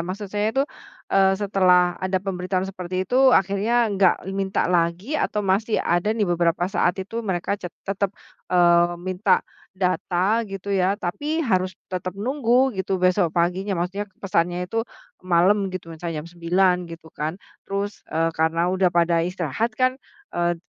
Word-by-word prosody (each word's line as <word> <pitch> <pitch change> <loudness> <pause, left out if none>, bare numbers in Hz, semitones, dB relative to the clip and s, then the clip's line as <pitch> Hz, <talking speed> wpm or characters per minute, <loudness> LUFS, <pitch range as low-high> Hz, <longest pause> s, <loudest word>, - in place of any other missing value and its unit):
maksud 185 +5 -4
saya 210 +1 +1
itu, 270 +5 +1 0.5
eee, 195 0 +4
setelah 185 -3 +3
ada 185 0 0
pemberitahuan 185 0 -2
seperti 185 -1 -4
itu 260 +2 +5
akhirnya 200 +5 +2
enggak 190 -2 +4 0.2
minta 195 0 0
lagi 175 - 0
atau 210 -8 -1
masih 200 +4 +1
ada 175 +4 +1
nih 215 - +2
beberapa 175 -1 +1
saat 175 -1 +1
itu 210 +5 -4
mereka 190 -4 -2
ce 180 - -5 0.2
tetap, 195 0 -1 0.4
eee, 175 -1 +4
minta 185 +3 +1 0.3
data 185 +3 +1
gitu 195 0 -5
ya, 190 +1 +2
tapi 290 - -2
harus 185 -5 0 0.2
tetap 185 +1 -4
nunggu 255 +2 +2
gitu 190 0 -1
besok 185 0 +2
paginya. 185 +3 0
Maksudnya 190 +4 -3
pesannya 175 -2 0
itu 225 +5 -2 0.4
malam 185 +3 +3
gitu, 185 -3 -7
misalnya 160 -1 -5
jam - - -11
9.00 180 +1 +1
gitu 165 -1 -11
kan, 155 +3 -3 0.3
terus, 200 +1 -3
eee, 165 +1 0
karena 165 +2 +1
udah 185 -1 +3
pada 170 -1 +2
istirahat 180 - -2
kan, 255 +2 +1 0.3
eee, 175 0 0
185 Hz, 155 wpm, -23 LUFS, 175-200 Hz, 0.5 s, itu